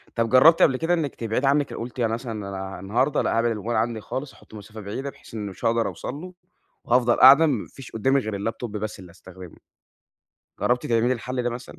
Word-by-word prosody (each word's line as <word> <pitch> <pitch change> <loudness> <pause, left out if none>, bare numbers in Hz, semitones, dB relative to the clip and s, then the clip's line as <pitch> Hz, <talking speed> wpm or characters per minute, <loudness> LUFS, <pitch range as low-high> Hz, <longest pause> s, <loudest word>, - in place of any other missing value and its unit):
طَب 115 -1 0
جرّبتِ 155 +6 +6
قبل 130 -3 +4
كده 165 +4 0
إنِك 155 -5 -1
تبعِدي 115 +4 -1
عنِك 145 +1 +1
أ - - -6
قُلتِ 120 +2 -7
أنا 115 -1 +1
مثلًا 120 0 -5 0.2
أنا 95 0 -6
النهارده 125 +9 0
لأ، - - 0
هابعِد 115 -2 0
الmobile 105 - -9
عندي 115 0 -1
خالص، 135 +5 -6
هاحطّه - - -20
في - - -11
مسافة 105 +2 -11
بعيدة 130 +8 -5
بحيث - - -16
إن 105 -2 -4
مش 95 - -8
هاقدَر 115 0 +2
أوصَل 130 - -6
له 180 +4 -9 0.5
وهافضَل 120 0 +3
قاعدة 140 +5 +9
ما 130 -9 -1
فيش 135 - -13
قُدّامي 135 +5 +1
غير 105 -2 -4
الlaptop 120 - -8
بس 105 -1 -5
اللي 90 -2 -12
استخدمه، 90 0 -13 1.0
جرّبتِ 125 0 0
تعملي 120 +1 +2
الحل 125 +1 -3
ده 120 - -1
مثلًا؟ 120 +1 -9
120 Hz, 220 wpm, -24 LUFS, 110-130 Hz, 1.0 s, قاعدة